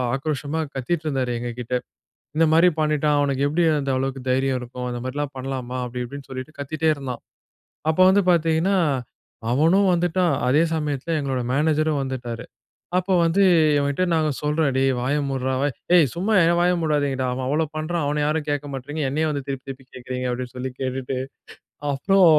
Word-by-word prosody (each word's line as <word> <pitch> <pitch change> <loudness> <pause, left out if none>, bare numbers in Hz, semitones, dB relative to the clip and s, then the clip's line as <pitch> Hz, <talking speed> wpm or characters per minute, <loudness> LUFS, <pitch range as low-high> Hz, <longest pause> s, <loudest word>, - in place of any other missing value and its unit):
ஆக்ரோஷமா 150 +2 -2 0.2
கத்திட்டு 155 +5 -2
இருந்தாரு 130 -4 -1
எங்கக்கிட்ட. 120 +1 -5 0.6
"இந்த 165 - +4
மாரி 170 +3 +6
பண்ணிட்டான். 150 -1 +2
அவனுக்கு 140 -1 +1
எப்டி 170 +3 +2 0.2
அந்த 135 -1 -1
அளவுக்கு 135 0 -2
தைரியம் 135 0 +1
இருக்கும். 125 +1 -6
அந்த 120 0 -4
மாரில்லாம் 145 +2 -3
பண்ணலாமா!" 130 -1 -4
அப்பிடி 125 0 -4
இப்பிடினு 140 +3 -9
சொல்லிட்டு, 130 +4 -7
கத்திட்டே 155 +3 0
இருந்தான். 135 -3 -6 0.7
அப்போ 160 - +1
வந்து 200 +1 +4
பாத்தீங்கன்னா, 165 +3 +2 0.8
அவனும் 175 +8 +4
வந்துட்டான். 175 -1 +1
அதே 145 +6 +4
சமயத்தில 150 +1 -2
எங்களோட 135 -3 -1
மேனேஜரும் 155 0 +2
வந்துட்டாரு. 125 -3 -5 0.5
அப்போ 185 +1 +1
வந்து, 175 +4 +3 0.3
இவன்கிட்ட 140 +5 +1
நாங்க 155 -1 +2
சொல்றோம். 150 0 +1
"டேய்! 135 0 +3
வாய 135 +4 0
மூட்றா! 130 -1 -1
வாய்" 145 -2 0 0.2
"ஏய், 165 -5 +6
சும்மா 195 +6 0
என் 170 +1 +3
வாய 180 - +4
மூடாதீங்கடா! 145 -4 0
அவன் 130 +1 -3
அவ்ளோ 155 +2 +1
பண்ணுறான், 160 +1 -2
அவன 150 +1 0
யாரும் 150 0 -1
கேக்க 145 0 -1
மாட்றீங்க. 145 +4 -5
என்னையே 155 +3 0
வந்து 140 -2 -4
திருப்பி 135 -1 -4
திருப்பி 135 -1 -8
கேக்குறீங்க"அப்டின்னு 125 -1 -4
சொல்லி 130 +1 -3
கேட்டுட்டு, 130 0 -2 0.8
அப்புறம் 190 +7 +4
145 Hz, 160 wpm, -23 LUFS, 130-160 Hz, 0.8 s, மாரி